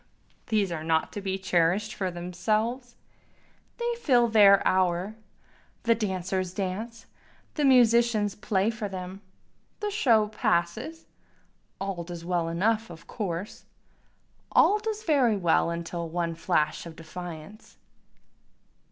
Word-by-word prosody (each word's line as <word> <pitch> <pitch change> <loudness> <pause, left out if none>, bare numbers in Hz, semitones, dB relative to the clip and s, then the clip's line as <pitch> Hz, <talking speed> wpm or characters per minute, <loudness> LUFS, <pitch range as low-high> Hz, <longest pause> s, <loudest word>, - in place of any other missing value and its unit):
these 210 -5 +1
are 160 -2 -4
not 160 0 0
to 205 - -5
be 190 -1 -2
cherish'd 190 +3 +1
for 190 -2 -2
themselves, 215 +8 -2 0.8
They 475 0 -1
fill 245 - +4
their 200 -3 +6
hour, 185 +2 +1 0.7
the 230 - +4
dancers 185 -3 -2
dance, 210 +4 -4 0.5
the 295 - 0
musicians 235 -5 +4
play 200 +1 0
for 220 -3 -5
them, 185 +1 -7 0.6
The 420 0 -2
show 230 - +3
passes, 220 - -1 0.7
all 195 -3 -3
does 170 -1 -8
well 175 -2 0
enough 215 +6 0
of 165 -2 -12
course, 190 -2 -5 0.9
All 420 - +5
does 435 0 -4
very 265 - +3
well 170 -2 +2
till 170 0 -5
one 170 0 -2
flash 165 -1 0
of 165 - -10
defiance. 170 +4 -10
195 Hz, 120 wpm, -27 LUFS, 175-230 Hz, 0.9 s, their